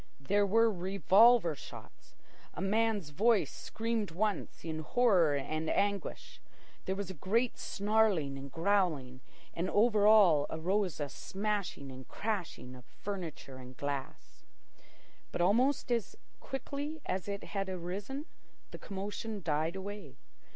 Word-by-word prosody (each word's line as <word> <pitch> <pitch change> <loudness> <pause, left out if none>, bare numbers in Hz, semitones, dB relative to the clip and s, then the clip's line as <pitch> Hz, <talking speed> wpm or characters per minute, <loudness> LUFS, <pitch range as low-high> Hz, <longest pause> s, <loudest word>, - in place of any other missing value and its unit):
There 200 +9 +2
were 225 +3 +4
revolver 195 +1 +4
shots. 145 - -12 0.4
A - - -6
man's 205 -3 +1
voice 220 +6 +3
screamed 225 -2 -3
once 200 +1 -2
in 160 -1 -3
horror 180 - +3
and 155 +3 -2
anguish. 200 -1 -2 0.4
There 190 - -1
was 195 -1 -4
a - - -7
great 225 - 0
snarling 200 -8 +1
and 135 0 -8
growling, 165 -8 0 0.3
and 175 +3 -2
over 210 -1 +4
all 185 -9 +6
arose 185 +3 -1
a 145 - -1
smashing 190 -4 -3
and 130 0 -10
crashing 195 - -4
of 125 -1 -12
furniture 165 -9 -7
and 130 0 -11
glass. 140 -2 -5 0.9
But - - -2
almost 245 +9 +2
as 235 -3 0 0.2
quickly 285 +3 -5
as 185 +1 -2
it 200 0 -4
had 195 -2 -3
arisen, 195 - -4 0.5
the - - -8
commotion 205 +1 -5
died 160 +2 0
away. 190 -8 -7
195 Hz, 130 wpm, -32 LUFS, 160-215 Hz, 0.9 s, all